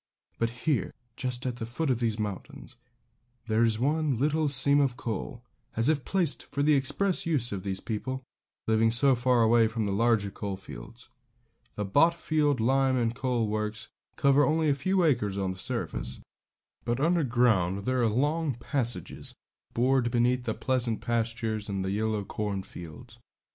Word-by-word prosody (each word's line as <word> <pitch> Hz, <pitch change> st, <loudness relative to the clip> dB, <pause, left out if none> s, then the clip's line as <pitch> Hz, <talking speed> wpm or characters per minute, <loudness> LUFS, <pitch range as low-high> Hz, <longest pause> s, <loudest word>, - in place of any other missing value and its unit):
But 115 Hz, -, +1 dB, 0.2 s
here, 145 Hz, -, 0 dB, 0.2 s
just 125 Hz, -1 st, -3 dB
at 125 Hz, -2 st, -2 dB
the 115 Hz, -, -4 dB
foot 135 Hz, +5 st, -1 dB
of 120 Hz, -, 0 dB
these 115 Hz, -3 st, 0 dB
mountains, 120 Hz, +5 st, -6 dB, 0.7 s
there 110 Hz, 0 st, +1 dB
is 115 Hz, -2 st, +3 dB
one 145 Hz, +1 st, +1 dB
little 150 Hz, +3 st, +1 dB
seam 140 Hz, +1 st, +5 dB
of 135 Hz, -4 st, +1 dB
coal, 120 Hz, +2 st, -5 dB, 0.3 s
as 115 Hz, +5 st, +3 dB
if 150 Hz, -4 st, +1 dB
placed 180 Hz, -6 st, 0 dB
for 140 Hz, -, -2 dB
the 150 Hz, +1 st, +4 dB
express 165 Hz, +8 st, +1 dB
use 140 Hz, -8 st, +1 dB
of 100 Hz, -2 st, -3 dB
these 95 Hz, 0 st, -3 dB
people, 130 Hz, +4 st, -4 dB, 0.4 s
living 110 Hz, 0 st, +3 dB
so 130 Hz, +4 st, +4 dB
far 125 Hz, -1 st, +2 dB
away 115 Hz, 0 st, +4 dB
from 110 Hz, -1 st, -2 dB
the 100 Hz, -, -1 dB
larger 110 Hz, -1 st, +2 dB
coal 100 Hz, -1 st, -5 dB
fields. 95 Hz, -, -11 dB, 0.7 s
The 105 Hz, -, -2 dB
Botfield 150 Hz, -, +2 dB
lime 130 Hz, +3 st, +2 dB
and 115 Hz, -2 st, 0 dB
coal 125 Hz, -3 st, -1 dB
works 105 Hz, 0 st, -3 dB, 0.3 s
cover 140 Hz, +1 st, +4 dB
only 155 Hz, 0 st, +2 dB
a -, -, +4 dB
few 185 Hz, +7 st, +1 dB
acres 110 Hz, -, +1 dB
of 95 Hz, -1 st, -1 dB
the 95 Hz, -, -13 dB
surface; -, -, -3 dB, 0.6 s
but 120 Hz, +1 st, -1 dB
underground 120 Hz, -, +2 dB
there 130 Hz, -1 st, +1 dB
are 115 Hz, -, +3 dB
long 145 Hz, +5 st, 0 dB
passages 120 Hz, 0 st, -2 dB, 0.4 s
bored 125 Hz, 0 st, +2 dB
beneath 125 Hz, +1 st, +1 dB
the -, -, -2 dB
pleasant 125 Hz, -4 st, 0 dB
pastures 115 Hz, -2 st, -2 dB
and 95 Hz, -1 st, -2 dB
the 95 Hz, -, -2 dB
yellow 105 Hz, 0 st, -1 dB
cornfields. 100 Hz, +2 st, -6 dB
120 Hz, 165 wpm, -28 LUFS, 110-140 Hz, 0.7 s, seam